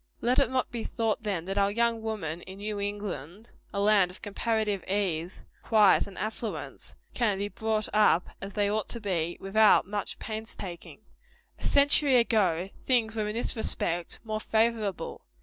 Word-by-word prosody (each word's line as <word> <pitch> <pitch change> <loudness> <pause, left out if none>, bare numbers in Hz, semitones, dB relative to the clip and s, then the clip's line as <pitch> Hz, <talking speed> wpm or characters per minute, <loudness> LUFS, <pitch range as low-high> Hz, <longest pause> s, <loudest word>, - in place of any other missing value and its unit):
Let 245 +2 +2
it - - +2
not 260 0 -1
be 235 -2 -4
thought, 225 -1 -1
then, 195 -6 -2
that 195 +2 -1
our 200 0 +3
young 230 +1 +1
women 185 -7 -4
in 190 +2 -10
New 205 0 -4
England 200 - -5 0.2
a 200 - -3
land 200 -3 +4
of 180 - -12
comparative 210 -1 -1
ease, 185 -3 -2 0.2
quiet 210 -3 +4
and 195 - -12
affluence 220 +1 -5 0.2
can 215 -5 +1
be 200 +1 -2
brought 220 0 -1
up 210 -5 +4
as 195 0 -6
they 205 -1 +1
ought 210 0 -1
to 235 - 0
be, 175 -5 -2
without 215 +2 +4
much 205 +1 -2
pains 220 0 -5
taking. 175 -4 -8 0.6
A - - -13
century 280 -1 +5
ago, 195 -7 +2
things 230 -3 +1
were, 215 -1 -1
in 210 - -4
this 235 - +1
respect, 175 -6 -1
more 215 -1 -3
favorable. 220 -4 0
210 Hz, 170 wpm, -28 LUFS, 195-220 Hz, 0.6 s, century